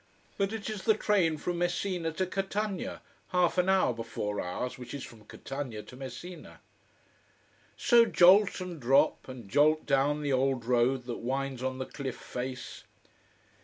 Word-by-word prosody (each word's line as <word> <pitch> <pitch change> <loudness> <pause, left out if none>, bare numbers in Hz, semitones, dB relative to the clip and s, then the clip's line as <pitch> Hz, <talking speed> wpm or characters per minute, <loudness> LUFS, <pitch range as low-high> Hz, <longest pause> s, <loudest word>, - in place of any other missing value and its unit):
But 195 0 0
it 220 -2 -5
is 215 -3 -4
the 220 - +5
train 190 -7 +2
from 175 +3 -3
Messina 175 -1 -1
to 185 +3 0
Catania, 195 +1 -3 0.2
half 180 0 +2
an 180 +1 +2
hour 190 -9 +3
before 115 -3 -4
ours, 125 +8 -4
which 125 +2 -7
is 140 - -6
from 110 -2 -12
Catania 130 -3 -6
to - - -13
Messina. 135 +7 -9 1.2
So 240 -3 +5
jolt, 195 +1 +5
and 180 -3 -6
drop, 130 +3 +3
and 125 -5 -9
jolt 150 +7 +3
down 145 +2 +1
the 140 -2 0
old 130 -2 +1
road 125 +1 +2
that 120 -1 -4
winds 135 +1 -3
on 130 0 -2
the 130 - -3
cliff 135 -3 -6
face. 125 +1 -6
140 Hz, 160 wpm, -30 LUFS, 125-180 Hz, 1.2 s, the